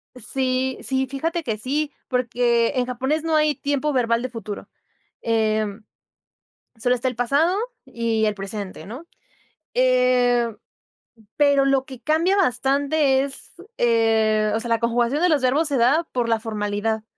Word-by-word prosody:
Sí, 255 +1 -1
sí. 265 0 0
Fíjate 325 +6 -3
que 220 -5 -2
sí, 290 +7 -2 0.2
porque 240 -1 +1
en 250 -1 +1
japonés 265 +5 -2
no 325 -1 0
hay 305 -1 +3
tiempo 285 +1 -1
verbal 235 -2 +1
de 255 - -3
futuro, 220 -3 -7 0.5
em, 215 -2 0 0.9
sólo 245 +3 +1
está 250 +1 -1
el 250 - -5
pasado 285 +10 +2 0.3
y 230 -2 -1
el 210 - 0
presente, 195 -1 -7
¿no?, 260 +11 -9 0.7
eh, 250 -1 +3 0.9
pero 285 -2 +4
lo 270 -1 +2
que 260 -2 -11
cambia 320 +8 +2
bastante 275 -3 +2
es, 275 -1 -7 0.2
eh, 220 -2 +2
o - - 0
sea, 235 - -5
la 230 -1 +2
conjugación 240 +5 +1
de 360 - +4
los 290 -4 +2
verbos 290 +5 +2
se 280 - 0
da 275 +8 +3
por 245 -2 -1
la 225 -1 +1
formalidad. 215 0 -2
250 Hz, 150 wpm, -22 LUFS, 230-280 Hz, 0.9 s, pero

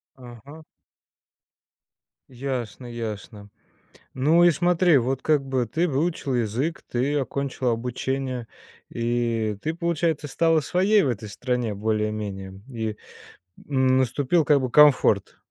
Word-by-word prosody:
Ага. 130 +5 -13 1.7
Ясно 125 -2 -5
ясно. 110 -3 -7 0.6
Ну 155 +6 +3
и 175 - +7
смотри, 175 -1 +3
вот 130 +1 -1
как 150 -3 +2
бы 130 -2 0
ты 160 +10 0
выучила 150 -2 -1
язык, 120 +8 -2
ты 130 +4 0
окончила 135 -2 -1
обучение, 125 +1 -3 0.4
и 115 -3 -1
ты, 160 - -2
получается, 165 -3 -1
стала 165 +3 +2
своей 190 +7 +2
в 140 - +1
этой 110 -2 -4
стране 125 +1 -2
более-менее? 105 -2 -3
И 110 -4 -4 0.7
н 130 -2 +3
наступил 135 +5 +1
как 145 -2 +3
бы 130 - -2
комфорт. 140 -8 +4
130 Hz, 115 wpm, -24 LUFS, 115-150 Hz, 1.7 s, и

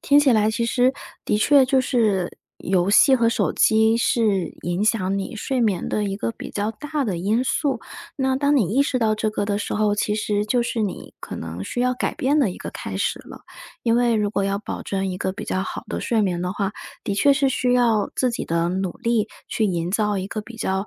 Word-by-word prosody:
听 285 +1 +4
起 285 -3 +5
来 215 -1 +3
其 230 +1 -1
实 250 +2 +2 0.3
的 210 - +2
确 275 +5 +5
就 265 0 +3
是 215 -8 +1 0.3
游 180 0 +1
戏 245 +6 +6
和 235 -3 +3
手 230 - 0
机 220 0 +4
是 210 -6 +1 0.2
影 175 +3 -1
响 200 -3 +1
你 195 +3 -5
睡 255 +4 -2
眠 205 -7 0
的 210 - -1
一 195 -1 -2
个 230 - -3
比 - - -9
较 205 +1 -2
大 295 +4 -3
的 185 -6 -2
因 215 +7 +1
素。 270 -1 0 0.4
那 265 -1 +1
当 285 +1 +2
你 210 -3 +1
意 275 - +5
识 270 -3 -1
到 220 -2 +2
这 215 0 -1
个 215 - -2
的 200 0 -1
时 210 - -3
候， 210 -1 +2
其 210 0 0
实 210 -1 -1
就 240 +3 +2
是 235 -1 -2
你 205 -3 -4
可 - - -7
能 85 +3 -6
需 170 - -5
要 250 0 +2
改 250 - -2
变 280 +3 +1
的 265 -9 +3
一 - - -8
个 - - -7
开 - - -6
始 - - -1
了。 - - -12 0.4
因 230 -1 +2
为 240 -1 +3
如 210 -1 0
果 200 - 0
要 195 0 0
保 205 - -6
证 195 -1 -2
一 185 -1 -4
个 190 - -1
比 210 +2 -7
较 185 - -1
好 - - -6
的 - - -3
睡 225 -2 +1
眠 180 -3 -1
的 180 0 -2
话， 195 -1 -1 0.3
的 200 - -1
确 280 +8 +4
是 275 -1 +2
需 250 -1 +1
要 230 -4 +2
自 255 -1 +2
己 235 - -4
的 170 +1 0
努 185 -1 -2
力， 230 -3 0 0.2
去 220 - -1
营 175 -2 -1
造 210 +1 +1
一 185 - -3
个 215 +2 -4
比 225 +2 -12
较 190 -1 -2
215 Hz, 260 characters per minute, -22 LUFS, 195-245 Hz, 0.4 s, 戏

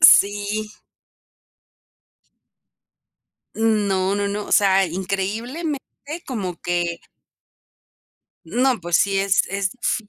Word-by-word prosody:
Sí. 205 -5 +5 2.8
No, 200 -4 +1
no, 200 0 0
no. 205 +1 -3
O - - -5
sea, 195 -1 +5
increíblemente 210 - -3 0.5
como 195 -9 -4
que 175 -1 -1 1.4
No, 255 0 +1
pues, 170 -1 +1
sí 195 -1 +2
es 195 0 +3
es 195 -1 -1
f 220 -3 -1
200 Hz, 90 wpm, -22 LUFS, 190-220 Hz, 2.8 s, Sí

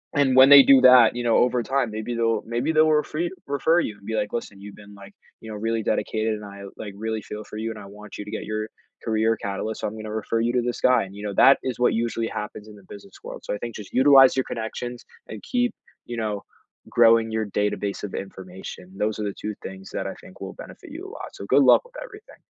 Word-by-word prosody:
And 135 -3 +3
when 130 +1 +8
they 140 -1 +10
do 135 -1 +6
that, 125 -3 +7
you 120 - -3
know, 115 -1 +3
over 125 0 +2
time, 130 -3 -1
maybe 110 +3 -4
they'll 115 -2 +1
maybe 120 +7 -1
they'll 155 0 +4
refer 150 0 0
y 175 - -1 0.2
refer 160 +4 +2
you, 105 -2 -5
and 100 - -19
be 110 - -2
like, 105 -1 -2
"Listen, 105 -4 -5
you've 100 0 -10
been, 105 0 -14
like, 100 0 -14 0.3
you 110 -1 -9
know, 105 - -6
really 115 +1 -2
dedicated, 110 0 -1
and 105 -1 -9
I, 100 0 -10
like, 100 -2 -7
really 110 0 -3
feel 105 +1 -8
for 105 - -10
you, 110 +1 -3
and 110 - -7
I - - -10
want 105 +1 -11
you 105 - -7
to 105 - -9
get - - -4
your 110 +1 -4 0.3
career 110 0 +1
catalyst, 100 +2 -4
so - - -1
I'm 105 - -6
gonna 110 0 -7
refer 110 +1 -2
you 120 +2 0
to 125 - +2
this 120 0 -3
guy," 125 -4 +4
and 95 0 -10
you 105 - -9
know, 100 -1 -4
that 135 +7 +6
is 130 -2 -3
what 125 - +3
usually 115 0 -1
happens 105 0 -7
in 105 - -12
the 100 - -17
business 100 -1 -12
world, - - -9
so - - -4
I - - -3
think 120 0 -7
just 105 -2 -10
utilize 135 0 +6
your 130 - +1
connections, 120 +2 -6 0.2
and 110 -2 -9
keep, 245 0 0 0.3
you 120 - -6
know, 105 -3 -3 0.5
growing 115 -1 +4
your 110 -1 -1
database 105 0 -2
of 100 - -9
information. 95 -1 -9
Those 110 0 -1
are - - -2
the 100 - -3
2 105 +2 -5
things 95 0 -9
that - - -3
I - - -5
think - - -15
will - - -6
benefit - - -12
you - - -8
a - - -10
lot, - - -9
so 100 - -8
good 135 +5 +4
luck - - +6
with - - -20
everything. 425 -3 -14
110 Hz, 260 wpm, -24 LUFS, 105-125 Hz, 0.5 s, they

